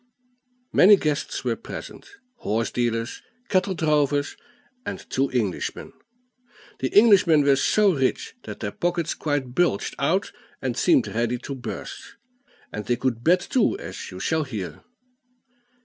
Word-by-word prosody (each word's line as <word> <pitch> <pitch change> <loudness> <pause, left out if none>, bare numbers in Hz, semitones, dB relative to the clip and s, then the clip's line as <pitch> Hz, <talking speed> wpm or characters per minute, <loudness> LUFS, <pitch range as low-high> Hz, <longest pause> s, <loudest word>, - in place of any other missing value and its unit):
Many 205 +3 +8
guests 150 -6 -2
were - - 0
present - - -9 0.3
horse 115 - -1
dealers, 115 -1 -2 0.3
cattle 190 0 +1
drovers, 145 -3 +1 0.5
and - - -6
two 135 +1 +1
Englishmen. 110 -7 -2 0.9
The 130 - -2
Englishmen 195 -8 +6
were 140 -1 +5
so 205 +7 +3
rich 135 -4 -1
that - - -8
their 105 -2 -2
pockets 170 +2 -1
quite 145 -5 -2
bulged 175 - +1
out 175 +8 +1 0.3
and - - -2
seemed 300 -8 +3
ready 120 +2 -1
to 140 - -5
burst; 125 - -7 0.6
and 105 - -4
they 120 - +2
could 120 -2 -2
bet 180 +4 +4
too, 255 - +1
as - - -7
you - - -9
shall 160 -1 0
hear. 110 -10 -6
145 Hz, 135 wpm, -24 LUFS, 120-180 Hz, 0.9 s, Many